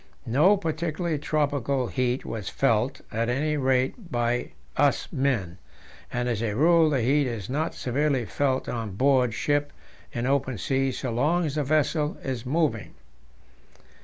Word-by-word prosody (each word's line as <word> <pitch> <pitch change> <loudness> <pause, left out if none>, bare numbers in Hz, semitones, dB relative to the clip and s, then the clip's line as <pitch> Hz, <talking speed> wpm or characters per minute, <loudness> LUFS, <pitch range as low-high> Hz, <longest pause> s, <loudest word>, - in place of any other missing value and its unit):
No 155 - +4
particularly 165 -2 -2
tropical 140 -3 0
heat 125 +1 -1
was 110 -3 -4
felt, 135 +1 +1
at 115 +2 -1
any 150 +5 0
rate 135 - 0
by 120 0 0 0.3
us 145 0 +2
men; 120 - -1 0.5
and 125 0 -1
as 115 -3 -1
a 110 -3 -1
rule 165 +4 +5
the 135 -4 +1
heat 140 +3 +3
is 115 -2 -5
not 155 +4 -1
severely 135 0 0
felt 130 +2 0
on 110 -5 -4
board 130 0 +3
ship 145 0 0 0.4
in 120 -1 -3
open 130 -2 0
sea 135 +5 0
so 125 0 -4
long 155 +9 +1
as 145 - -2
the 150 0 0
vessel 150 +1 +1
is 125 -3 -4
moving. 155 +2 0
135 Hz, 150 wpm, -26 LUFS, 125-150 Hz, 0.5 s, rule